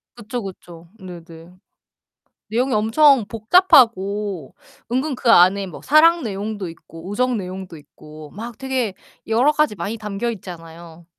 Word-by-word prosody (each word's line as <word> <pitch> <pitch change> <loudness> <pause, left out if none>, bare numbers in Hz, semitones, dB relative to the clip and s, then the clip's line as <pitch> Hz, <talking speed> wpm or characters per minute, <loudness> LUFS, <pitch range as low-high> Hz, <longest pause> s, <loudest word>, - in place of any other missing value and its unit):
그쵸, 240 +1 -6
그쵸. 175 -3 -11
네네. 170 -2 -12 1.0
내용이 250 +5 0
엄청 230 +4 +4
복잡하고 210 - +2 0.4
은근 265 +3 -1
그 250 -1 -1
안에 195 0 +5
뭐 180 - -11
사랑 330 +4 +4
내용도 205 -2 -5
있고 165 +1 -13
우정 250 +4 0
내용도 185 -3 -7
있고 155 +1 -14
막 230 +2 -9
되게 260 -6 -2 0.3
여러 240 +7 +3
가지 300 -7 0
많이 195 +5 -5
담겨 210 +1 -4
있잖아요. 170 -4 -11
205 Hz, 270 characters per minute, -20 LUFS, 175-245 Hz, 1.0 s, 안에